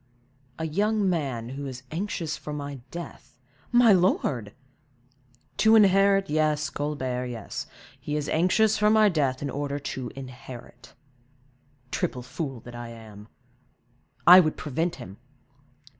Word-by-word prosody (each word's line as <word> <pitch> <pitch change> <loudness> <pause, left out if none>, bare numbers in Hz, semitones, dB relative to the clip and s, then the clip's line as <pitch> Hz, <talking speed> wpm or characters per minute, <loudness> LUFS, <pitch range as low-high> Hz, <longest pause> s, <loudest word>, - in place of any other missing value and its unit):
"A 160 - -3
young 205 +5 +1
man 135 -10 -2
who 140 +2 -6
is 130 -1 -8
anxious 170 -2 -3
for 150 - -8
my 145 -2 -5
death—" 170 -6 -9 0.3
"My 240 -3 +6
lord!" 140 - +1 1.1
"To 220 +1 +5
inherit, 195 -1 +5
yes, 150 -1 0
Colbert, 130 -4 -3
yes; 115 -4 -6 0.3
he 150 - -4
is 150 -1 -2
anxious 205 +6 +2
for 210 0 +4
my 215 -1 +5
death, 140 -6 0
in 140 - -2
order 145 +1 -3
to 130 -3 -5
inherit. 125 -2 -11 1.0
Triple 125 - -2
fool 130 -1 -5
that 120 - -11
I 120 0 -7
am! 110 -2 -12 1.0
I 180 +2 +11
would 155 -4 +1
prevent 165 +4 -2
him!" 95 +2 -10
150 Hz, 130 wpm, -26 LUFS, 130-180 Hz, 1.1 s, I